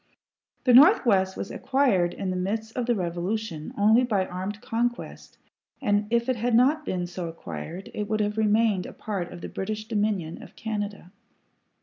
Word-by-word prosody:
The 250 - +4
Northwest 235 - +6
was - - -5
acquired 225 -11 +1
in 190 -1 -3
the - - -2
midst 215 +5 -3
of 245 -2 -2
the 240 - +3
Revolution 175 -1 -3
only 220 +4 +5
by 205 -6 +1
armed 185 +3 -5
conquest, 240 +2 -3 0.4
and 205 0 +1
if 235 +1 +1
it 255 -2 +1
had 235 +1 +1
not 280 +6 +4
been 180 -1 -1
so 175 0 -5
acquired, 165 - -7
it 210 0 -4
would 215 0 0
have 210 0 0
remained 215 -2 +2
a - - -10
part 195 -5 -4
of 175 - -9
the - - -5
British 215 +2 -4
Dominion 205 -7 -1
of - - -13
Canada. 205 -4 -5
210 Hz, 175 wpm, -26 LUFS, 185-230 Hz, 0.4 s, Northwest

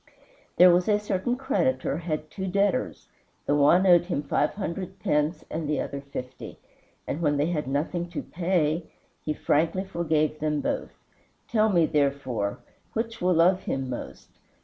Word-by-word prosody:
There 180 0 +8
was 180 +3 +2
a 210 - +4
certain 210 +3 -1
creditor 265 - 0
had 155 -2 -4
two 190 -2 -4
debtors; 200 +1 0 0.4
the - - +1
one 150 +6 +5
owed 175 -2 +6
him 170 -5 -2
five 145 +1 0
hundred 190 -2 -5
pence 150 +3 0
and 155 -1 -3
the 150 - 0
other 140 0 -4
fifty, 130 -2 -8 0.5
and 155 - -3
when 145 -3 +2
they 150 +4 +1
had 150 -5 -2
nothing 165 +5 -2
to 170 - -5
pay 170 -2 0 0.3
he 155 - -1
frankly 165 +7 +1
forgave 160 -4 0
them 150 -1 0
both. - - -3 0.5
Tell 220 -2 +2
me, 175 -5 +4
therefore, 135 -9 0 0.4
which 225 0 -3
will 180 0 +3
love 180 +3 +4
him 135 -1 -2
most. 120 - -8
165 Hz, 160 wpm, -26 LUFS, 150-185 Hz, 0.5 s, There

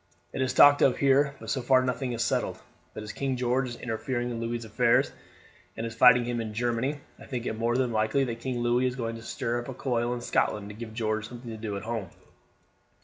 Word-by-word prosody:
"It - - -2
is 130 - +1
talked 145 0 +7
of 130 - +4
here, 140 +1 +3
but - - -5
so 135 - 0
far 130 +1 +4
nothing 125 0 -2
is 115 -1 -1
settled; 115 - -1 0.4
but 110 - -6
as 105 - -6
King 135 0 -2
George 125 +1 0
is 120 - -6
interfering 120 +1 -3
in 115 - -4
Louis's 115 0 -3
affairs, 115 +2 +2 0.7
and 115 - -3
is 115 - -5
fighting 125 +1 +6
him 120 -1 -2
in 110 -1 -6
Germany, 120 +5 -1 0.2
I - - -12
think 125 -3 -4
it - - -1
more 115 +2 0
than 130 -2 +1
likely 110 +5 +1
that 115 -3 -3
King 125 -1 -3
Louis 120 +2 +2
is 125 - -3
going 115 -3 -3
to - - -10
stir 115 +1 -2
up 120 - -9
a 130 - -6
coil 120 -2 -1
in 120 - -6
Scotland 105 -3 0
to 105 - -9
give 110 0 -8
George 110 -1 -1
something 120 -1 -8
to - - -6
do 105 -2 -4
at - - -7
home." 110 -4 -4
120 Hz, 240 wpm, -28 LUFS, 115-125 Hz, 0.7 s, talked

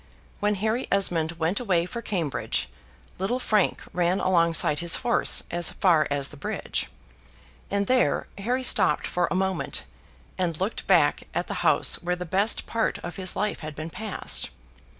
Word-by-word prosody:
When 210 0 +1
Harry 220 +5 -1
Esmond 170 -5 +1
went 165 +4 0
away 185 -8 +1
for 235 +6 -6
Cambridge, 175 - -2 0.5
little 195 +7 0
Frank 215 -6 +1
ran 180 +2 +1
alongside 170 -4 +3
his 170 0 +4
horse 245 -1 +2
as 175 -1 +2
far 165 -5 +3
as 145 -1 0
the 150 - -11
bridge, 135 - -3 0.8
and 200 0 0
there 255 +3 +2
Harry 250 +6 -1
stopped 150 -10 +3
for 180 -1 0
a - - -1
moment, 190 0 -1 0.6
and 170 -4 -1
looked 195 +5 -3
back - - +3
at - - 0
the - - -5
house - - +3
where 180 +1 -1
the 180 0 -6
best 195 +6 +1
part 230 -1 -1
of 175 - -6
his 185 -1 -2
life 210 +1 -1
had 155 -2 -7
been 155 +2 -6
passed. 215 0 -2
185 Hz, 165 wpm, -26 LUFS, 165-210 Hz, 0.8 s, his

